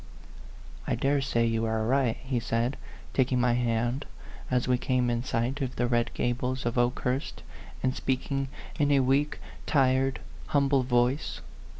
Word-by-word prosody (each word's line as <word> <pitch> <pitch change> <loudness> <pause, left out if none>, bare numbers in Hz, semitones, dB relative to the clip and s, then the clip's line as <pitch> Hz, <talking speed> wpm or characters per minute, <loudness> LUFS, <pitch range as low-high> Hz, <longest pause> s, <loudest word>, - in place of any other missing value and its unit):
" - - -17
I - - +1
dare 140 +1 +1
say 120 -3 +1
you 115 0 +1
are 110 0 0
right," 130 -1 +2
he 130 -2 -1
said, 115 +2 0 0.4
taking 130 -1 +2
my 125 -1 +3
hand 120 +2 0 0.4
as 125 -1 +1
we 125 -1 +2
came 125 -2 +1
in 120 0 -1
sight 130 +3 -1
of 130 -2 -2
the 120 - +1
red 120 -1 +1
gables 125 +1 -1
of 120 - -1
Okehurst, 125 - -1 0.4
and 130 0 +1
speaking 135 +1 -1 0.3
in 145 -1 +3
a 140 -1 +5
weak, 135 +3 +1 0.3
tired, 135 -1 +2 0.3
humble 140 -1 +3
voice. 125 - 0
125 Hz, 160 wpm, -28 LUFS, 120-135 Hz, 0.4 s, a